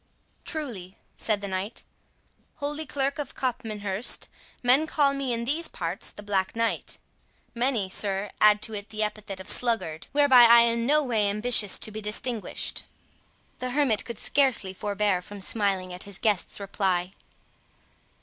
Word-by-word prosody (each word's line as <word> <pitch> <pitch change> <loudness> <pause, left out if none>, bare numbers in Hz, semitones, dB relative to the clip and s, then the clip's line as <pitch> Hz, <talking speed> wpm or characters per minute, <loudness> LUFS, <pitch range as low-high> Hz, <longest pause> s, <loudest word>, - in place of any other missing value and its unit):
"Truly," 225 - -5 0.2
said 210 -2 -1
the 200 - -4
knight, 190 +3 -4 0.7
"Holy 295 +1 -4
Clerk 280 +1 -1
of 290 - -5
Copmanhurst, 215 -4 -2 0.3
men 265 +6 +4
call 285 -3 +2
me 275 -2 -2
in 235 0 -2
these 310 +6 0
parts - - -3
the 205 - -10
Black 195 -1 -1
Knight,—many, 230 0 -3
sir, 195 +1 -2
add 210 0 +6
to 220 - 0
it 205 0 -6
the 215 0 -1
epithet 210 -2 -4
of 190 - -10
Sluggard, 225 -10 +3
whereby 265 -4 +7
I 235 0 +8
am 235 0 +1
no 300 +2 +4
way 220 -6 +1
ambitious 210 -1 +2
to 215 - -2
be 215 +1 -6
distinguished." 215 +2 -3 0.8
The 255 0 -3
hermit 255 -5 +1
could 235 -2 -8
scarcely 260 -9 +1
forbear 200 -1 0
from 205 +3 -10
smiling 195 -3 0
at 180 - -6
his 200 -2 -6
guest's 210 -3 0
reply. 190 -2 -1
215 Hz, 150 wpm, -26 LUFS, 200-250 Hz, 0.8 s, I